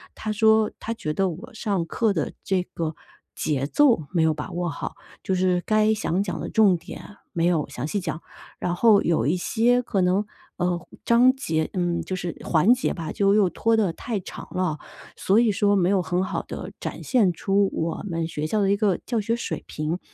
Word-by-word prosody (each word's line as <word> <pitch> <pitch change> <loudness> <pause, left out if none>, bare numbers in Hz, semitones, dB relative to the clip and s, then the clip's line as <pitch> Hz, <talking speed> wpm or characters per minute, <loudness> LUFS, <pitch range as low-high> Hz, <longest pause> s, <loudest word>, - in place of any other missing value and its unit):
他 215 - -4
说， 220 0 +4
他 230 - -3
觉 155 -9 -4
得 195 +1 +1
我 205 +10 -9
上 200 -6 -1
课 215 +4 0
的 155 -5 -2
这 185 -2 0
个 165 -3 -4 0.4
节 140 -3 -1
奏 240 - +3
没 170 -3 +2
有 160 -1 +3
把 150 - -6
握 175 -1 -2
好， 145 - -5 0.3
就 190 - -1
是 180 -1 +2
该 215 0 +3
想 195 -3 -1
讲 185 - -4
的 - - -4
重 205 -5 +4
点 - - -10 0.3
没 170 -1 +1
有 165 -4 +1
详 125 - -5
细 205 - -1
讲， 160 -3 -4 0.4
然 175 - -1
后 215 0 +5
有 160 -8 +1
一 170 - +2
些 240 +6 +2
可 200 -5 -1
能， 185 +3 +2 0.3
呃， 180 -1 -1 0.2
章 250 +3 +5
节 160 -11 -1
嗯， 175 -2 0
就 185 - -4
是 175 -2 -4
环 175 +8 +4
节 255 - -1
吧， 165 -3 -5
就 200 0 +2
又 205 -4 +4
拖 225 +4 +1
得 210 -6 +2
太 225 +2 -4
长 180 - -9
了， 180 -5 -1 0.4
所 200 +4 +3
以 235 -3 +4
说 205 0 +2
没 185 -2 +2
有 200 -1 +3
很 180 +2 -1
好 - - -3
地 - - -7
展 - - -5
现 210 -9 +3
出 195 +3 +1
我 165 0 -2
们 165 -1 -2
学 155 -2 -4
校 210 +4 0
的 195 - +2
一 200 - +2
个 200 -5 +1
教 235 - -1
学 225 +2 0
水 235 - -4
平。 155 +2 -3
哎 - - 0
呀， - - -8
185 Hz, 230 characters per minute, -24 LUFS, 170-215 Hz, 0.4 s, 后